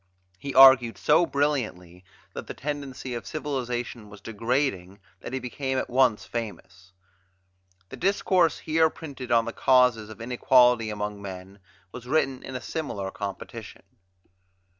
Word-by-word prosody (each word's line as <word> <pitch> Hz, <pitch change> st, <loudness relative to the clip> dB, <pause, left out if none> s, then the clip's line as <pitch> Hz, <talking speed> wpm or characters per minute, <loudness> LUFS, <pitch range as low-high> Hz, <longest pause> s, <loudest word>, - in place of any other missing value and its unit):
He 140 Hz, -1 st, -6 dB
argued 130 Hz, -3 st, +7 dB
so 170 Hz, -, +3 dB
brilliantly 110 Hz, -, -2 dB, 0.3 s
that -, -, -7 dB
the -, -, -7 dB
tendency 140 Hz, -3 st, -5 dB
of 120 Hz, -, -6 dB
civilization 125 Hz, -6 st, -4 dB
was 105 Hz, 0 st, -13 dB
degrading 115 Hz, -3 st, -2 dB, 0.2 s
that -, -, -8 dB
he 130 Hz, -, -2 dB
became 130 Hz, +1 st, -3 dB
at 130 Hz, -, -3 dB
once 120 Hz, -6 st, +2 dB
famous. 100 Hz, -3 st, -7 dB, 1.0 s
The -, -, -9 dB
discourse 185 Hz, -3 st, +2 dB
here 160 Hz, 0 st, +2 dB
printed 140 Hz, -6 st, -9 dB
on 115 Hz, -1 st, +4 dB
the 115 Hz, -, -5 dB
causes 125 Hz, -5 st, +3 dB
of 110 Hz, 0 st, -11 dB
inequality 125 Hz, -1 st, +3 dB
among 105 Hz, -1 st, -5 dB
men 95 Hz, 0 st, -9 dB, 0.3 s
was 125 Hz, +1 st, -10 dB
written 135 Hz, -2 st, 0 dB
in 130 Hz, -, -8 dB
a 125 Hz, -, -4 dB
similar 100 Hz, -12 st, -4 dB
competition. 100 Hz, -2 st, -8 dB
125 Hz, 140 wpm, -26 LUFS, 105-135 Hz, 1.0 s, argued